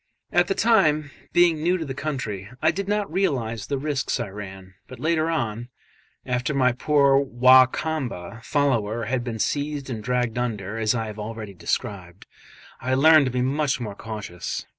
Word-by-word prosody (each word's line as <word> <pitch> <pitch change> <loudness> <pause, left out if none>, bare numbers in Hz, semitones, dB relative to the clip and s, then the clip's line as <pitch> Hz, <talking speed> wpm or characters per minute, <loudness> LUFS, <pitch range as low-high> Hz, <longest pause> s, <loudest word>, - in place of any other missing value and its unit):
At 175 0 +3
the 195 - 0
time, 155 -10 +3 0.2
being 170 -3 +4
new 175 +3 +2
to 165 - -4
the 135 - -5
country, 125 -9 -4
I 160 - +3
did 200 0 -4
not 205 0 -1
realise 120 - -1
the 140 - -1
risks 140 -1 -1
I - - -3
ran; 95 -2 -9
but 130 - -10
later 160 0 +1
on 120 -7 -2 0.6
after 125 +3 -1
my 130 -2 +4
poor 140 +2 +3
Wa 130 -1 +6
Kamba 125 - -4
follower 120 -6 0
had 125 +2 -1
been 120 -2 -4
seized 145 +3 -2
and 110 -3 -5
dragged 125 -1 -1
under, 110 -3 -3
as 110 +2 +1
I 115 -1 -1
have 105 0 -8
already 110 -1 -6
described 90 0 -4 0.6
I 130 +2 0
learned 155 +1 +6
to - - -2
be 125 0 0
much 140 +1 0
more 110 -4 -5
cautious. 105 -5 -6
130 Hz, 175 wpm, -24 LUFS, 110-150 Hz, 0.6 s, Wa